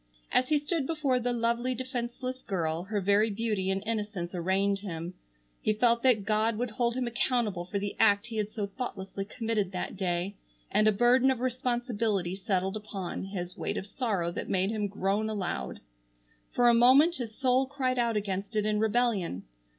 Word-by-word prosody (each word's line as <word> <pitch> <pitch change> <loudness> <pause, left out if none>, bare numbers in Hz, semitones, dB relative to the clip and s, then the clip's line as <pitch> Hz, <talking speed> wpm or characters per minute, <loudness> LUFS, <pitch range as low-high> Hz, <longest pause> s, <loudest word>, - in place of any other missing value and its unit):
As 255 - +3
he 305 - +4
stood 290 -1 0
before 290 -6 +1
the 245 0 -1
lovely, 235 +2 0
defenceless 255 +1 -4
girl 170 -3 -2
her 205 +1 -1
very 200 +3 +3
beauty 210 -3 -1
and 195 +1 0
innocence 210 -5 -3
arraigned 190 +3 +1
him. 175 -3 -6 0.5
He 215 - +2
felt 235 +2 +3
that 240 -6 +3
God 215 +1 +2
would 245 0 -2
hold 235 +2 0
him 255 -1 -1
accountable 235 -6 0
for 195 +3 -3
the 200 0 -3
act 205 -2 +5
he 230 -2 -5
had 210 -1 -1
so 215 -1 -3
thoughtlessly 195 -3 -5
committed 220 -3 -2
that 180 - -3
day, 185 +1 -1 0.3
and 215 - +4
a - - +6
burden 240 +5 +4
of 260 -3 0
responsibility 240 -7 -1
settled 190 -1 -1
upon 200 -4 -5
his 180 -2 -5
weight - - -2
of - - -4
sorrow 200 -7 -1
that - - -5
made 190 +2 +2
him 210 -2 -1
groan 200 +2 -1
aloud. 180 - -3 0.7
For 245 - +3
a 240 - +7
moment 265 +9 +6
his 230 -4 -6
soul 260 0 +2
cried 260 -2 -1
out 230 -2 +1
against 200 +1 -3
it 210 -1 +1
in 210 0 +1
rebellion. 220 - 0
215 Hz, 180 wpm, -29 LUFS, 195-245 Hz, 0.7 s, a